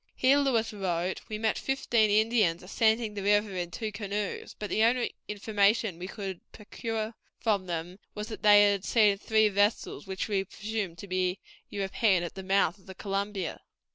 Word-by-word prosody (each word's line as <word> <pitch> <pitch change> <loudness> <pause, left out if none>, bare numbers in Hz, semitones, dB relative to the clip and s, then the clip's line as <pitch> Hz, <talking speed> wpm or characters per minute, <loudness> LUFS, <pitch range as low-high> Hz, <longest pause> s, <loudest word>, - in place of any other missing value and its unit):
Here, 270 +2 +4
Lewis 235 -6 +1
wrote, 185 -2 -2
"we 215 - -3
met 220 0 0
fifteen 240 -5 +1
Indians 215 -5 +2
ascending 220 +2 +1
the 205 - -5
river 205 0 +2
in 175 -1 -3
two 215 +4 -4
canoes; 205 0 -4
but 210 - -5
the 215 - +1
only 240 +2 +2
information 205 -2 +1
we 180 - -5
could 195 -3 -6
procure 220 +1 -5 0.3
from 205 -5 0
them 175 +2 -4 0.2
was 210 +1 -4
that 220 - -7
they 205 -1 +7
had 200 -2 -2
seen 210 -4 +3
three 220 0 +3
vessels, 205 0 0
which 190 0 -3
we 200 -3 0
presumed 210 -4 -4
to 200 - -9
be 185 0 0 0.3
European, 195 -1 +1
at 175 - -5
the 190 - -7
mouth 195 -1 +1
of 190 - -23
the 190 - -9
Columbia." 195 -2 -3
205 Hz, 175 wpm, -29 LUFS, 190-220 Hz, 0.3 s, they